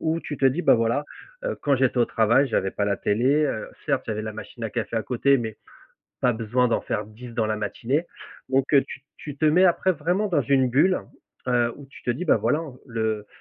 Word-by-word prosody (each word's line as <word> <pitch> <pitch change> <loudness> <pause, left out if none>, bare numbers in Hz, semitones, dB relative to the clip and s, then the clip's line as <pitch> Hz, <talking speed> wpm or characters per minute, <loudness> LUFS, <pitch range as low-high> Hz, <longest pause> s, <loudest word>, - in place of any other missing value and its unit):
où 160 +1 0
tu 145 - -6
te - - -1
dis: 135 +7 +1
«Bah, - - +6
voilà, 115 +5 +1 0.4
heu, - - -2
quand 140 -2 +3
j'étais 130 -1 +1
au 120 - +5
travail, 120 +5 +3
j'avais 95 -4 0
pas 100 - -1
la 100 -1 0
télé, 130 +9 +2
heu, 110 - -4 0.2
certes - - 0
j'avais 110 -1 -2
la 110 - -5
machine 115 +1 -10
à - - -1
café 115 -2 -3
à 110 - 0
côté 135 +4 +2
mais 110 -3 -5 0.7
pas 125 - +4
besoin 120 +3 +1
d'en 115 - 0
faire 105 - -3
10 110 +4 -11
dans 110 -2 0
la 110 - 0
matinée» 120 +9 -2 0.4
donc 135 +2 +1
heu, 140 - +6
tu 135 - -9 0.2
tu 145 -2 -8
te 155 - +1
mets 175 +5 +5
après 185 +1 +3
vraiment 180 +7 0
dans 170 -7 +2
une 130 0 +2
bulle, 155 +9 +3 0.5
heu, 120 -1 +2
où 145 - -11
tu - - -14
te - - -3
dis: 140 +9 -4
«Bah, - - +4
voilà, 150 - +1
hein, 155 -6 -7
le 110 -2 -2
125 Hz, 235 wpm, -24 LUFS, 110-145 Hz, 0.7 s, Bah